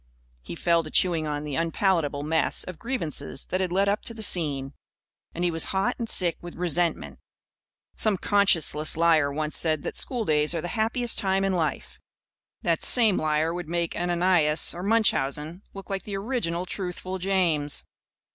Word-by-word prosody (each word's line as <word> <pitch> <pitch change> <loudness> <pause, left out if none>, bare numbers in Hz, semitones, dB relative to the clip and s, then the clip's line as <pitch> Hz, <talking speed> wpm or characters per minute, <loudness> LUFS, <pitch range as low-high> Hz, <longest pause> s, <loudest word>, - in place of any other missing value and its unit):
He 75 +8 -8
fell 170 - +2
to 155 - -9
chewing 165 -2 +2
on 145 0 -3
the 150 -1 -6
unpalatable 165 -3 0
mess 160 +2 0
of 185 -3 -9
grievances 165 - -3
that 185 - 0
had 185 -2 -2
led 195 +2 +1
up 205 +2 0
to 230 - -2
the 220 - -1
scene. 145 -8 0 0.6
And 175 - -3
he 175 - +1
was 165 -1 -1
hot 195 +6 -1
and 230 -2 -4
sick 175 -3 +3
with 175 0 -9
resentment. 175 -1 -2 0.8
Some 215 -3 +1
conscienceless 170 -7 +3
liar 160 -4 +3
once 155 +1 -3
said 155 -3 +1
that - - -5
schooldays 160 - +1
are 165 - -2
the 175 - -5
happiest 230 +1 +1
time 195 0 0
in 195 - 0
life. 165 -4 -3 0.6
That - - 0
same 225 -6 +6
liar 155 +1 0
would 175 -2 -6
make 170 -1 -2
Ananias 175 -3 +2
or 175 - -7
Munchausen 175 -6 0
look 195 0 -9
like 195 -1 -2
the 200 0 -5
original 195 -6 -2
Truthful 185 0 -5
James. 175 -6 0
175 Hz, 170 wpm, -25 LUFS, 155-195 Hz, 0.8 s, same